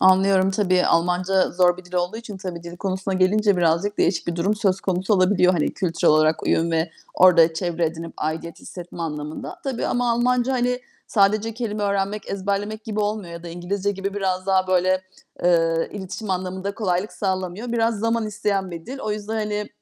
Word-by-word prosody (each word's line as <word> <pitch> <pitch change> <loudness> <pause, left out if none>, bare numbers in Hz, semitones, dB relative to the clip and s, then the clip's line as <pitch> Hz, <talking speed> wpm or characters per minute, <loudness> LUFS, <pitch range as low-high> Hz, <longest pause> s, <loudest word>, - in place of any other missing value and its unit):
Anlıyorum. 190 0 +5
Tabii 185 -2 +2
Almanca 180 +3 +2
zor 175 -1 +3
bir 185 - -12
dil 180 +1 -13
olduğu 180 +4 0
için 225 -3 -8
tabii 180 -3 -6
dil 170 0 -9
konusuna 190 +1 -2
gelince 200 +2 +3
birazcık 175 +4 +1
değişik 170 -1 +1
bir 170 - -2
durum 190 +5 +1
söz 195 -3 +1
konusu 190 +2 0
olabiliyor. 185 -1 +4
Hani, 165 -4 0
kültürel 170 -5 +2
olarak 155 +1 +3
uyum 165 +1 +1
ve 165 0 0 0.2
orada 170 -3 +6
çevre 170 -1 0
edinip 165 +1 -6
aidiyet 160 +2 -4
hissetme 175 -1 -8
anlamında. 150 -1 -5
Tabii 265 -4 -2
ama 245 -1 +1
Almanca, 250 +2 +2
hani, 250 0 0 0.3
sadece 215 +2 +2
kelime 215 -3 -3
öğrenmek, 200 +1 -1
ezberlemek 200 +2 -2
gibi 215 -1 -2
olmuyor 205 -4 -2
ya 170 0 -8
da 175 - -7
İngilizce 185 +4 -2
gibi 195 0 -4
biraz 185 -2 -1
daha 190 -1 +2
böyle, 185 0 +2 0.4
eee, 165 -2 +3
iletişim 200 +1 -6
anlamında 185 +2 -3
kolaylık 190 -1 -1
sağlamıyor. 190 +4 -3
Biraz 230 -2 +1
zaman 230 +1 0
isteyen 205 -3 -1
bir 165 -1 -8
dil. 270 +2 -6
O 215 - -3
yüzden, 210 +1 -4
hani, 210 -1 -2
190 Hz, 180 wpm, -23 LUFS, 175-210 Hz, 0.4 s, orada